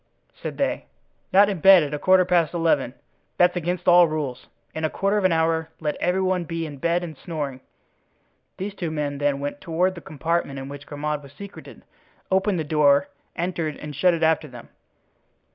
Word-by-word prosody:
said - - -5
they, - - -1 0.4
"not 200 +2 +6
in 195 -4 -2
bed 190 0 +8
at 145 0 -4
a 150 - -2
quarter 185 +1 +4
past 175 -2 +2
eleven. 150 -6 +1 0.4
That's 180 0 +4
against 175 +1 -3
all 175 -1 +7
rules. 150 -5 -4 0.3
In 160 - -5
a 155 - +1
quarter 200 +5 0
of 195 - -1
an 185 - +4
hour 160 0 +1
let 150 -2 -2
every 185 +2 0
one 185 -1 0
be 165 0 -4
in 145 -2 -8
bed 170 +5 0
and 160 -3 -7
snoring." 145 -4 -5 1.0
These 195 +2 -4
two 175 -4 -4
men 145 -2 -3
then 145 -1 +1
went 145 0 -5
toward 180 +3 0
the 170 - -10
compartment 155 -1 -2
in 135 0 -6
which 145 0 -9
Grimaud 150 0 -3
was 140 -1 -15
secreted; 200 +6 -11 0.5
opened 190 0 +2
the 160 - -1
door, 145 -2 +3 0.3
entered 170 -3 -2
and 150 -1 -8
shut 180 +4 +3
it 165 - -3
after 160 0 +2
them. - - -12
160 Hz, 195 wpm, -24 LUFS, 150-180 Hz, 1.0 s, bed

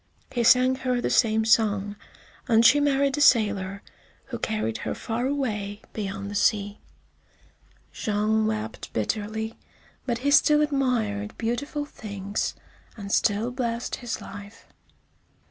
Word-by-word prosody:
He 240 -2 0
sang 255 +2 +5
her 255 -2 -1
the - - -1
same 220 -2 +3
song, 205 -2 +2 0.5
and 230 -2 +4
she 290 - +7
married 280 0 +2
a - - 0
sailor 205 -7 +3 0.4
who - - -6
carried 110 +1 -2
her - - -3
far 235 +3 -2
away 215 -7 -3
beyond 200 -1 -4
the - - -6
sea. 205 0 +1 1.1
Jean 215 0 0
wept 220 +1 -4
bitterly, 220 - -3 0.5
but 240 -2 0
he 285 - +3
still 300 +1 +5
admired 235 -8 -1
beautiful 285 +6 -2
things, 205 -6 -4 0.4
and 200 -2 -7
still 215 +4 +1
blessed 240 -1 -3
his 240 -2 -4
life. 200 +2 -11
220 Hz, 130 wpm, -25 LUFS, 205-250 Hz, 1.1 s, she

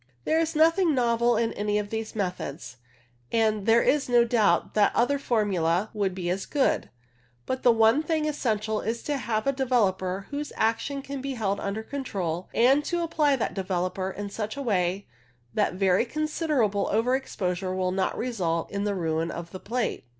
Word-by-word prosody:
There 320 - +2
is 325 -1 -1
nothing 330 +1 +4
novel 235 -1 +2
in 225 0 0
any 210 0 -1
of 205 -1 -3
these 220 0 -4
methods, 180 - -4 0.5
and 215 -2 +1
there 230 +1 +5
is 290 -3 +2
no 240 -1 +5
doubt 230 -3 +2
that 210 -1 +3
other 280 +4 +2
formulae 200 -6 +1
would 200 -4 -1
be 180 -2 -4
as 190 +1 -3
good; 280 -3 +1 0.6
but 260 - -2
the 245 - +6
one 225 +5 +4
thing 315 -1 -1
essential 220 -7 -1
is 230 +2 -3
to 290 -1 -1
have 220 -3 -2
a 275 - +3
developer 195 -8 0
whose 290 +1 -4
action 230 +5 0
can 275 -1 -6
be 270 0 -4
held 200 -4 -1
under 200 +3 -3
control, 190 - -4
and 265 +5 +4
to 345 -1 -1
apply 300 -3 +2
that 250 - -2
developer 185 0 -2
in 200 +1 -6
such 215 +3 -4
a - - -3
way 190 -4 0 0.5
that 205 -4 +1
very 190 +2 +3
considerable 295 - 0
over 230 +5 +2
exposure 185 -7 -3
will 185 -1 0
not 190 0 -1
result 180 -9 -2
in 200 0 -2
the 205 -1 0
ruin 165 -2 -1
of 170 0 -7
the 185 - -7
plate. 235 - -3
220 Hz, 180 wpm, -26 LUFS, 190-260 Hz, 0.6 s, the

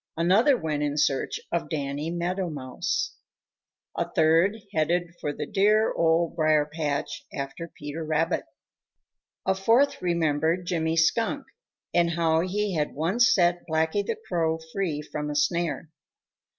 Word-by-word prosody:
Another 205 - +4
went 155 -6 -2
in 145 0 -1
search 135 -2 +1
of 170 - -1
Danny 145 0 -3
Meadow 175 +2 -2
Mouse. 130 -4 -3 0.8
A - - -2
third 165 +6 +3 0.2
headed 170 +2 0
for 145 - -1
the - - -5
dear 210 +2 +3
Old 165 0 +2
Briar 155 -2 +3
patch 150 -2 -3
after 140 +5 -5
Peter 145 +2 -5
Rabbit. 155 +1 0 1.0
A 190 - +3
fourth 225 +9 +2
remembered 165 0 +1
Jimmy 165 -2 0
Skunk 230 - +1 0.5
and 170 -1 +3
how 165 -1 +2
he 195 +3 -1
had 150 -3 -1
once 200 - +3
set 175 -5 +3
Blacky 160 +5 +1
the 450 - -3
Crow 160 -2 0 0.2
free 165 -7 -2
from 150 0 -5
a 150 - -4
snare. 160 0 0
165 Hz, 140 wpm, -26 LUFS, 155-180 Hz, 1.0 s, Another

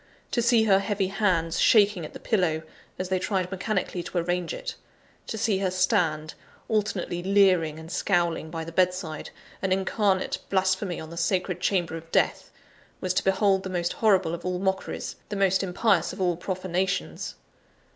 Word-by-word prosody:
To 240 - +1
see 235 -1 +4
her 195 -3 +5
heavy 195 -2 -1
hands 180 -5 +1
shaking 205 -5 +5
at - - -10
the - - -8
pillow, 170 -7 0 0.3
as 185 0 -4
they 185 -1 +1
tried 185 -1 -1
mechanically 190 -1 -2
to 175 - -5
arrange 175 0 -1
it; - - -5 0.5
to 220 - -4
see 215 -3 +1
her 195 -1 +1
stand, 180 -5 +1 0.3
alternately 205 -5 -1
leering 185 -5 +3
and 160 +1 -9
scowling 170 -5 0
by 165 0 -4
the 165 - -7
bedside, 180 -3 0 0.3
an 190 - -1
incarnate 190 0 +1
blasphemy 190 -1 +1
in 160 0 -8
the 170 - -8
sacred 180 +1 0
chamber 175 -4 0
of 165 0 -12
death, - - +1 0.5
was 185 -1 -1
to - - +1
behold 195 0 +3
the 190 - -6
most 175 -2 -1
horrible 205 - +3
of 170 0 -5
all 180 0 -1
mockeries, 190 0 -2
the 210 - -3
most 195 -1 +3
impious 190 -1 +1
of - - -10
all 180 -2 +2
profanations. 185 +1 -2
185 Hz, 170 wpm, -26 LUFS, 175-195 Hz, 0.5 s, her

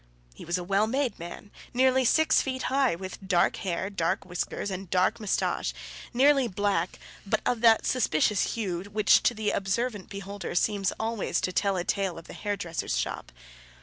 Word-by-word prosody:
He - - -11
was 175 +2 0
a 180 - -4
well 200 +4 +2
made 265 +1 -1
man, 175 +4 -9 0.2
nearly 260 +1 +4
six 315 +6 +4
feet 260 -1 -3
high, 270 -8 +3
with 190 +2 -8
dark 175 -2 +3
hair, 185 -1 -2
dark 170 -4 -1
whiskers, 180 +2 -3
and 190 -1 -6
dark 185 +5 +2
moustache, 210 -3 -1 0.4
nearly 270 +1 +4
black, 205 0 -1 0.3
but - - 0
of 240 -2 0
that 225 -2 +5
suspicious 210 -4 +1
hue 185 -7 -2
which 205 +1 +4
to 240 - +2
the 215 -1 0
observant 205 +1 -2
beholder 200 -2 -6
seems 200 +1 +1
always 225 -1 -1
to 185 - -2
tell 195 0 +1
a 175 - -1
tale 195 -2 -1
of 165 - -10
the - - -10
hairdresser's 200 -5 -3
shop. - - -3
200 Hz, 175 wpm, -27 LUFS, 185-230 Hz, 0.4 s, that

